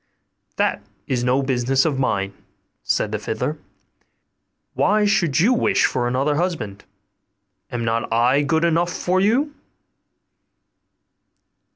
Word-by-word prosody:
'That - - 0 0.2
is 125 -2 -1
no 130 +2 +2
business 130 0 +1
of 145 -4 0
mine,' 100 -6 -1 0.5
said - - -1
the - - -2
fiddler: - - -3 1.1
'why 210 +1 +2
should 175 -8 +2
you 220 +10 +4
wish 210 -4 +2
for 120 -1 0
another 135 +4 0
husband? 135 - -3 0.9
Am 120 -1 -3
not 115 0 -1
I 120 +5 +3
good 160 +3 +1
enough 170 +1 +1
for 185 +1 0
you? 250 +10 +1
140 Hz, 115 wpm, -21 LUFS, 120-180 Hz, 1.1 s, you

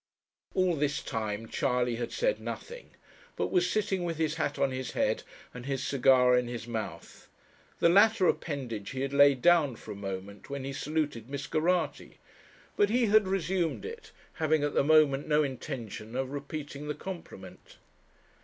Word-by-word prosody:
All 185 -2 +2
this 150 0 0
time 110 0 -3
Charley 125 -5 0
had 120 - -4
said - - 0
nothing, 485 +1 -8 0.4
but - - -2
was 180 -1 +2
sitting 195 -3 0
with 165 -2 -2
his 155 -2 0
hat 165 - -2
on 135 - +1
his 130 -1 -4
head, - - +1 0.3
and 125 +1 -8
his 135 -1 -2
cigar 125 -2 +5
in 125 -1 +1
his 120 -1 -5
mouth. 115 -3 -6 0.5
The - - +4
latter 200 +3 +5
appendage 120 -10 -2
he 130 - -4
had 135 0 -2
laid 140 -2 +5
down 165 -7 +5
for 110 - -10
a - - -6
moment 100 +2 -7
when 140 -1 -4
he 135 +1 -4
saluted 145 -4 -2
Miss 140 0 -4
Geraghty; 170 +5 -1 0.6
but 205 - +3
he 240 +2 +3
had 215 -1 +4
resumed 185 -2 -1
it, 450 -1 -8 0.2
having 155 -2 +1
at 145 - 0
the - - +3
moment 145 -2 +4
no 150 0 +3
intention 125 -5 -6
of 130 0 -2
repeating 145 0 -6
the 150 - -2
compliment. 100 - -9
145 Hz, 170 wpm, -29 LUFS, 125-170 Hz, 0.6 s, cigar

